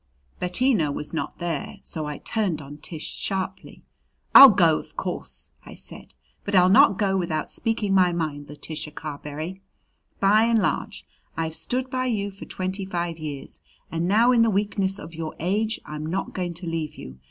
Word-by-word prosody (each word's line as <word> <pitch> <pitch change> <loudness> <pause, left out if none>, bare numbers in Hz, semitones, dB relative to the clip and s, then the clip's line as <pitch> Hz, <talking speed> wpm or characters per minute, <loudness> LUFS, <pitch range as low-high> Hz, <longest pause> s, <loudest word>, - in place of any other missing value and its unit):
Bettina 180 - +2
was 150 +2 -4
not 160 - -3
there, 170 -4 -3
so 155 -2 -5
I 150 -1 -5
turned 200 -8 -1
on 145 0 -10
Tish 160 -1 -7
sharply. 190 -1 -4 0.5
"I'll 275 0 +13
go, 170 -6 +4
of - - -14
course," - - -5
I - - -11
said; - - -12 0.3
"but 200 - -2
I'll 180 0 +6
not 195 0 +6
go 195 -1 +1
without 170 -4 -1
speaking 225 -4 -1
my 185 -2 +5
mind, 155 -4 -3
Letitia 150 +1 -6
Carberry. 155 +4 -6 0.6
By 210 +3 +5
and 230 0 +3
large, - - -2 0.3
I've 160 -1 -2
stood 255 +9 -2
by 255 0 -1
you 205 -4 -1
for 195 - -11
twenty 190 +2 -3
five 170 -3 -3
years, 145 -3 -7 0.3
and 165 +1 -1
now 225 +6 +5
in 240 -2 +4
the 230 - +4
weakness 200 -1 0
of 165 - -10
your 160 -1 -5
age 210 +6 0
I'm 150 0 -6
not 185 +4 -3
going 175 -2 -3
to 175 +2 -4
leave 165 -2 -3
you. 65 0 -10
180 Hz, 175 wpm, -24 LUFS, 155-200 Hz, 0.6 s, I'll